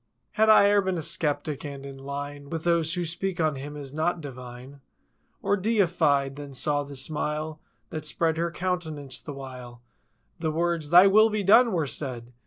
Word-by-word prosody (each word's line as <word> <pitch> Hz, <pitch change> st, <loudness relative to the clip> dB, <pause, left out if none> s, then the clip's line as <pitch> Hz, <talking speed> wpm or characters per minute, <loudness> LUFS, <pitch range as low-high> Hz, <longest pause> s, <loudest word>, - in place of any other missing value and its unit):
Had 220 Hz, 0 st, +3 dB
I 215 Hz, -2 st, +7 dB
e'er 205 Hz, 0 st, +4 dB
been 190 Hz, -2 st, -1 dB
a -, -, -2 dB
skeptic, 150 Hz, -3 st, -1 dB
and 140 Hz, -2 st, -7 dB
in 135 Hz, -1 st, -9 dB
line 140 Hz, +1 st, -6 dB
With 165 Hz, 0 st, -4 dB
those 170 Hz, -1 st, +1 dB
who 175 Hz, -1 st, -1 dB
speak 175 Hz, +3 st, -3 dB
of 155 Hz, -3 st, +1 dB
Him 145 Hz, +2 st, -7 dB
as 140 Hz, -2 st, -7 dB
not 170 Hz, +3 st, 0 dB
divine 130 Hz, -1 st, -10 dB, 0.6 s
Or 200 Hz, -, +2 dB
Deified, 170 Hz, -10 st, +1 dB
then 145 Hz, -2 st, -8 dB
saw 145 Hz, +3 st, +1 dB
the 140 Hz, 0 st, -8 dB
smile 150 Hz, +2 st, -3 dB, 0.3 s
That 155 Hz, -1 st, -5 dB
spread 160 Hz, +1 st, 0 dB
her 170 Hz, +1 st, 0 dB
countenance 160 Hz, -6 st, -3 dB
the 150 Hz, -, -8 dB
while 125 Hz, -3 st, -10 dB, 0.6 s
The 165 Hz, -1 st, -1 dB
words—"Thy 170 Hz, +2 st, +4 dB
will 215 Hz, +3 st, +6 dB
be 210 Hz, -1 st, -1 dB
done!" 230 Hz, +5 st, +6 dB
were 165 Hz, -5 st, 0 dB
said. 125 Hz, -4 st, -5 dB
155 Hz, 180 wpm, -26 LUFS, 140-175 Hz, 0.6 s, I